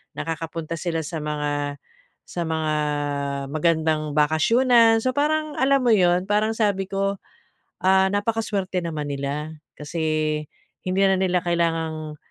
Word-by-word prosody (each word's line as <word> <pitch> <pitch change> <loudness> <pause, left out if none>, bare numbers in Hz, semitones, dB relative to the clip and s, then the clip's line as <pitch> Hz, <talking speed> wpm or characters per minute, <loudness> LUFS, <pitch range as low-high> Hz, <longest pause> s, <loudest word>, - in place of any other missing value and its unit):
nakakapunta 165 0 -4
sila 165 -2 -2
sa 160 +1 -5
mga, 145 -1 -2 0.5
sa 175 - -5
mga 160 -1 -1 0.8
magandang 155 -1 +1
bakasyunan. 225 - +4
So, 255 - +2
parang 305 +2 0
alam 270 0 +3
mo 240 - +4
'yon, 180 -3 +4
parang 215 +2 +1
sabi 200 -4 0
ko, 195 0 -1 0.6
"Ah, 190 0 +4
napakasuwerte 205 -3 -1
naman 155 -3 -4
nila" 145 +3 -4 0.2
kasi, 155 0 -1 0.4
hindi 185 +1 0
na 190 0 +4
nila 185 -1 +1
kailangang 160 -3 -1
170 Hz, 120 wpm, -23 LUFS, 155-205 Hz, 0.8 s, bakasyunan